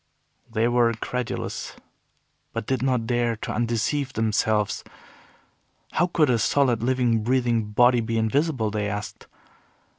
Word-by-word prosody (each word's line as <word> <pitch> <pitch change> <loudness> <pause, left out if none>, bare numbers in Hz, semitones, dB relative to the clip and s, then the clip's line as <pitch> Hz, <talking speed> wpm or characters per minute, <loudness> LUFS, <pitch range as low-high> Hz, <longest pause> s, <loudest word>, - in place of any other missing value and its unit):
They 110 +2 +1
were 120 -1 +3
incredulous, 120 +2 -4 0.8
but - - -3
did 130 0 -1
not 125 -3 +1
dare 120 0 0
to 105 - -6
undeceive 120 +4 -1
themselves. 110 -1 0 1.1
How 175 - +2
could 155 -6 +2
a 120 - +2
solid, 125 -1 +2
living, 120 -2 +1
breathing 120 -1 +1
body 120 +3 +4
be 115 0 -2
invisible, 115 0 0
they 105 -1 -1
asked. 105 +1 -6
120 Hz, 125 wpm, -24 LUFS, 110-125 Hz, 1.1 s, body